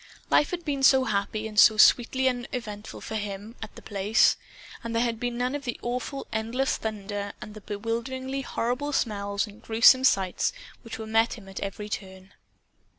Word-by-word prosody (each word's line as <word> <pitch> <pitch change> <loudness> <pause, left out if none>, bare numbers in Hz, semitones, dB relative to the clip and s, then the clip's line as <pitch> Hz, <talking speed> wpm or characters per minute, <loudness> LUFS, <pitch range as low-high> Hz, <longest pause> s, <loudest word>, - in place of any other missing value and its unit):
Life 295 - +4
had 345 -1 -5
been 280 -3 -2
so 265 -1 +6
happy 215 -1 -2
and 210 -1 0
so 220 - +7
sweetly 260 +4 +5
uneventful 240 -4 -4
for - - -7
him, 205 +2 -6
at 220 - -8
The - - -12
Place! 205 +1 +3 0.5
And 230 0 -4
there 230 - +3
had 230 -2 -2
been 245 0 -3
none 250 +2 -1
of 290 -1 -4
the 245 -3 -4
awful 250 +3 -3
endless 230 +5 0
thunder 205 -2 -4
and 210 - -9
the 215 - -11
bewilderingly 235 +6 -4
horrible 265 +3 -2
smells 200 -4 -1
and 210 0 -14
gruesome 230 +3 +5
sights 195 - +2 0.3
which 230 -2 -8
here 220 0 -6
met 225 +1 +2
him 205 -5 -11
at 195 - -7
every 200 +1 -5
turn. 190 -1 -7
225 Hz, 180 wpm, -26 LUFS, 205-250 Hz, 0.5 s, so